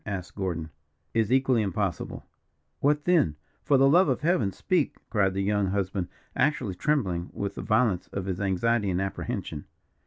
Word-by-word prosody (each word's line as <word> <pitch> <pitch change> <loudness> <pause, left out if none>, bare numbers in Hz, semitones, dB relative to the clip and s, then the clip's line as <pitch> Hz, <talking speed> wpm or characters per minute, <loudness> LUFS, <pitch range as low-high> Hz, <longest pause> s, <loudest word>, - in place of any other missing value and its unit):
asked 95 -4 -5
Gordon. 85 -5 -3 0.4
"Is 115 -1 +1
equally 130 -3 +3
impossible." 95 -2 -2 0.5
"What 150 +1 +2
then? 165 - +3 0.3
For 140 - +3
the 135 +1 +5
love 175 +7 +5
of - - 0
Heaven, 150 - +2
speak," 170 - 0
cried 95 -4 +2
the 100 - 0
young 100 0 +1
husband, 95 -1 -1 0.3
actually 135 -8 +1
trembling 90 - 0
with 100 -1 -3
the - - -6
violence 110 -5 +1
of 95 - -5
his 95 0 -3
anxiety 100 +2 +1
and 90 -1 0
apprehension. 95 -5 -4
100 Hz, 160 wpm, -27 LUFS, 95-130 Hz, 0.5 s, the